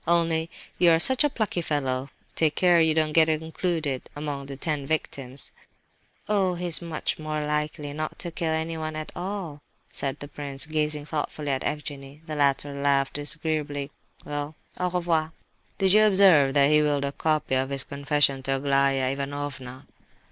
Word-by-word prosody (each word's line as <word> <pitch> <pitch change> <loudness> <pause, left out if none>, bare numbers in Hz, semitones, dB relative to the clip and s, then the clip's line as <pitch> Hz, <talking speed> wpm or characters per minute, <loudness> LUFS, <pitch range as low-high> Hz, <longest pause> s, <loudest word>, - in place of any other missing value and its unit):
"Only 165 -1 +2 0.3
you 175 - +6
are 165 - +6
such 260 - +4
a 295 - +3
plucky 215 -8 -2
fellow, 135 -4 -1 0.2
take 155 -2 +1
care 175 -2 +5
you 160 -1 +3
don't 155 -1 +1
get 160 0 +5
included 160 -3 -2
among 145 -2 -4
the 135 -1 -7
ten 145 -2 -2
victims!" 135 -4 -2 0.8
"Oh, 195 -4 +1
he 175 +1 -4
is 175 -1 +3
much 165 -2 -3
more 155 -1 -3
likely 150 -1 -2
not 155 +1 -4
to 175 - -4
kill 165 0 -2
anyone 160 0 -2
at 155 0 -5
all," 180 -5 -5 0.3
said 135 0 -3
the 145 - -8
prince, 140 -1 -5
gazing 150 -1 -1
thoughtfully 150 -1 -3
at 130 - -1
Evgenie. 145 0 -5
The 155 - -5
latter 140 0 +1
laughed 140 -1 +1
disagreeably. 145 -1 -2 0.3
"Well, 145 +1 -4 0.2
au 180 0 +1
revoir! 170 -3 0 0.4
Did 190 -1 +3
you 215 +1 +7
observe 185 -9 +6
that 140 +1 +5
he 150 0 +6
'willed' 145 -2 +1
a 140 - -2
copy 155 -1 0
of 130 +1 +1
his 135 -1 0
confession 140 -1 +1
to 135 +1 0
Aglaya 135 -1 +2
Ivanovna?" 140 -2 -5
150 Hz, 170 wpm, -26 LUFS, 140-160 Hz, 0.8 s, you